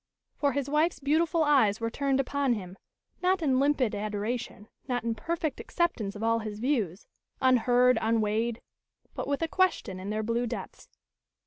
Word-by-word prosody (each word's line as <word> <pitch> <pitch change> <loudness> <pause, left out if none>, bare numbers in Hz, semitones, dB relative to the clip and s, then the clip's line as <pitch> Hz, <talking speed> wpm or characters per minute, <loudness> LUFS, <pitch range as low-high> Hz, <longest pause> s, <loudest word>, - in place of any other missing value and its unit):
For 285 -2 +1
his 280 -1 -1
wife's 305 +4 +1
beautiful 315 +3 +2
eyes 260 -9 +3
were 230 0 -2
turned 275 +1 0
upon 275 -1 +1
him, 185 -4 -6 0.5
not 365 -1 +2
in 265 -4 +2
limpid 275 -5 +2
adoration, 210 +1 -4 0.2
not 245 -2 -1
in 230 0 0
perfect 315 +5 -3
acceptance 240 - -1
of 210 - -6
all 230 0 +2
his 215 -2 -5
views, 220 - -1 0.3
unheard, 250 0 +4
unweighed; 225 +1 0 0.5
but - - -4
with 285 +3 -1
a - - +1
question 330 - 0
in 190 +2 -6
their 215 +1 -1
blue 230 +2 0
depths. 235 - -7
245 Hz, 160 wpm, -28 LUFS, 220-285 Hz, 0.5 s, unheard